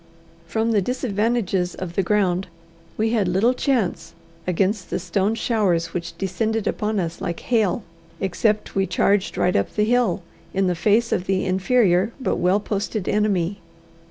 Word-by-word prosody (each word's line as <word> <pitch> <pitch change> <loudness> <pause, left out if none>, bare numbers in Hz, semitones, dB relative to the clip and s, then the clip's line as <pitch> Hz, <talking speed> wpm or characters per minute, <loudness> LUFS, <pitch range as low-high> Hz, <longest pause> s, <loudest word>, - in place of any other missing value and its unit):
From 225 +3 0
the 210 -3 +3
disadvantages 210 -5 0
of 180 -2 -6
the 195 - +1
ground, 190 -1 +1 0.5
we 220 +1 +1
had 215 -5 +2
little 195 +8 +3
chance 225 - -1 0.3
against 190 +2 0
the - - -1
stone 200 +4 0
showers 205 -8 0
which 170 -1 -5
descended 215 +4 -1
upon 210 -1 -1
us 170 -2 -3
like 170 - -3
hail, 220 -3 +1 0.4
except 210 +3 0
we 195 0 +1
charged 200 -1 +1
right 180 - +2
up 100 - 0
the 210 - +2
hill, 230 -6 +1 0.3
in 195 0 +2
the 180 - +2
face 215 +7 +2
of 180 - 0
the 190 0 +1
inferior 190 +1 +2
but 260 - -1
well 180 +3 +3
posted 205 -1 -3
enemy. 200 -2 +1
200 Hz, 155 wpm, -22 LUFS, 180-220 Hz, 0.5 s, the